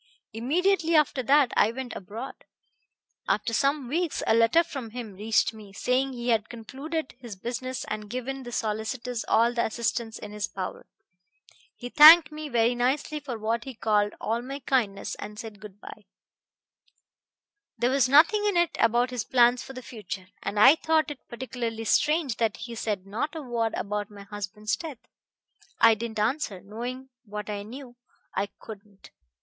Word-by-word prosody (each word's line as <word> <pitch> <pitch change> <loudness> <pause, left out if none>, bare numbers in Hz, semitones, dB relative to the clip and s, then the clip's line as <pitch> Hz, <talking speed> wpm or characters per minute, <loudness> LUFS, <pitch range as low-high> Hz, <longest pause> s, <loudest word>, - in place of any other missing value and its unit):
Immediately 330 - +1
after 300 -3 +3
that 275 +1 +4
I 210 - +4
went 255 0 -6
abroad. 225 +8 -7 0.9
After 230 - 0
some 275 +1 +1
weeks 330 +4 -1
a - - +3
letter 230 +9 +5
from 270 -8 -7
him 225 -2 -7
reached 220 +4 +1
me, 210 -3 -13
saying 260 +5 0
he 240 0 -4
had 225 -1 +1
concluded 275 +7 -5
his 235 -5 -8
business 255 +5 -4
and 210 -1 -5
given 255 +3 -4
the 240 -2 -8
solicitors 225 +2 -3
all 235 +2 +3
the 235 - +1
assistance 225 0 -2
in 210 - -9
his 210 0 -3
power. 185 -1 -6 0.9
He 245 - -7
thanked 310 +3 +9
me 305 0 -6
very 235 -1 +3
nicely 265 +5 0
for 265 -5 -6
what 225 +2 -2
he 265 -2 -7
called 210 -2 +1
all 230 +2 -1
my 270 +3 -6
kindness, 245 -7 -1
and 210 0 -8
said 215 -2 -8
good 205 -2 -12
by. - - -12 1.7
There 245 +2 +1
was 270 -2 +3
nothing 380 - +6
in 405 -4 +2
it 345 -1 +2
about 240 +2 +3
his 245 -4 -2
plans 245 -1 +4
for 270 - -9
the 255 -1 -8
future, 205 -5 -8
and 205 - -2
I 275 +9 +8
thought 315 -2 +1
it 285 - -11
particularly 235 -2 -4
strange 295 +2 +2
that 225 -3 0
he 235 +1 -7
said 210 -4 -3
not 230 +10 -3
a 315 - -5
word 235 -3 -1
about 205 0 -3
my 205 -1 -11
husband's 210 +2 -4
death. 305 -1 -7 0.8
I 230 0 +7
didn't 220 0 -5
answer. 220 -3 -1
Knowing 245 +6 -6
what 210 -1 -6
I 205 -1 -4
knew, 245 +3 -10 0.4
I 195 +2 -1
couldn't. 205 -2 -12
235 Hz, 170 wpm, -27 LUFS, 215-270 Hz, 1.7 s, thanked